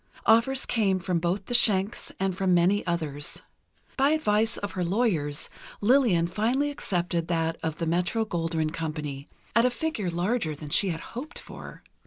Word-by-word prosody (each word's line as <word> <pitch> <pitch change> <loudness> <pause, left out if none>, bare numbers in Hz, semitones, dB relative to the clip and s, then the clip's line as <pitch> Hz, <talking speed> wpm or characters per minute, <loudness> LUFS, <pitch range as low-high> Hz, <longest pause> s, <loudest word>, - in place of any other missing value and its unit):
Offers 240 +4 +4
came 205 -5 +1
from 180 -2 -1
both 180 +3 -1
the - - -4
Schencks, 205 -3 +3
and 190 -1 0
from 185 -1 +2
many 185 +4 +3
others. 155 -4 -2 0.5
By 275 +1 +4
advice 225 -8 +1
of 205 - -4
her 180 - -2
lawyers, 170 -7 0 0.3
Lillian 220 -7 +4
finally 240 +10 0
accepted 175 - -2
that 165 -1 0
of 160 -2 -2
the 165 - -3
Metro 180 +7 0
Goldwyn 165 -4 -1
Company, 150 -3 -4 0.3
at 230 - +5
a 250 - +4
figure 245 - -2
larger 175 -1 -1
than 150 0 -9
she 195 +6 +3
had 165 -2 -3
hoped 270 +8 -6
for. - - -10
185 Hz, 165 wpm, -27 LUFS, 165-225 Hz, 0.5 s, at